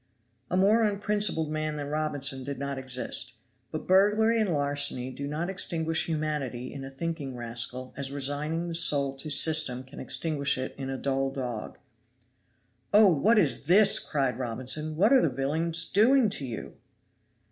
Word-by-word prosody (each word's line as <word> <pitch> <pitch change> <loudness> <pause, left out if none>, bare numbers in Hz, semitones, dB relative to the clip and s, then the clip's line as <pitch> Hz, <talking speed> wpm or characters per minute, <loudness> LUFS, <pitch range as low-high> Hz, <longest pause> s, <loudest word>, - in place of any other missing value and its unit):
A 180 - -1
more 205 +5 +3
unprincipled 205 -6 0
man 155 0 -3
than 145 -1 -5
Robinson 145 -3 -2
did 140 +1 -6
not 140 0 -4
exist; 130 -1 -2 0.3
but - - -6
burglary 210 +4 +3
and 205 -4 0
larceny 145 -4 +1
do 140 +2 -6
not 155 +4 -3
extinguish 165 -4 0
humanity 150 -6 -4
in 140 -1 -8
a 135 - -7
thinking 145 -2 -5
rascal 120 +2 -3
as 140 -1 -4
resigning 145 +4 -3
the 170 - -5
soul 140 -4 +3
to 145 +3 -7
system 145 -4 +4
can 130 +2 -13
extinguish 145 -5 0
it 130 - -5
in 135 -1 -6
a 135 - -4
dull 135 0 -1
dog. 125 -5 -6 1.1
"Oh, 205 -3 +6
what 210 +10 +2
is 145 -6 +1
this!" 200 +3 +5
cried 135 -5 -2
Robinson, 130 +6 -2
"what 210 - +3
are 265 - +6
the - - +1
villains 155 +6 0
doing 235 +3 +3
to 150 -8 0
you?" 115 -3 -7
150 Hz, 160 wpm, -27 LUFS, 135-170 Hz, 1.1 s, Oh